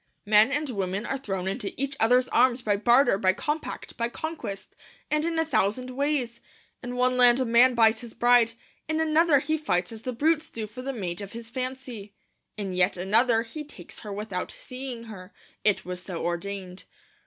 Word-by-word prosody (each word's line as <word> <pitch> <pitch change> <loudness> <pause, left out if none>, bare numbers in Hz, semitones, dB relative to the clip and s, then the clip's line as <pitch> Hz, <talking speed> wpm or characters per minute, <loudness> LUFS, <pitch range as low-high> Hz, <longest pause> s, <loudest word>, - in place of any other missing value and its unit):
Men 215 +4 +5
and 295 +1 0
women 195 0 -2
are 270 - -2
thrown 190 -7 -3
into 195 +3 -4
each 275 0 -2
other's 250 +3 +4
arms 250 0 +3
by 205 -3 +2
barter, 235 0 +4
by 185 -3 +4
compact, 300 +9 -4
by 235 0 -1
conquest, 275 -10 -6 0.4
and 300 0 +2
in 330 0 -1
a 325 - +2
thousand 250 -2 0
ways. 265 -3 -1 0.4
In 245 0 -5
one 250 0 +2
land 245 0 +6
a 260 - +1
man 240 +2 +5
buys 225 -1 +4
his 235 -1 -10
bride; 240 -1 +4 0.3
in 315 0 -1
another 320 -1 +4
he 310 +3 0
fights 180 -11 0
as 220 -1 -8
the 255 - -3
brutes 310 +5 +1
do 225 -1 -5
for 215 +4 -9
the 270 +2 -3
mate 185 -7 -4
of 200 0 -8
his 230 0 -8
fancy; 255 -5 -6 0.4
in 195 -3 -4
yet 180 +1 +2
another 225 +5 +3
he 300 +7 -7
takes 295 - -11
her 210 - -8
without 200 -2 -4
seeing 255 -2 -7
her, 200 -4 -11 0.3
it 210 -2 +2
was 180 0 -5
so 180 -3 -5
ordained. 185 +1 -4
235 Hz, 190 wpm, -26 LUFS, 200-265 Hz, 0.4 s, land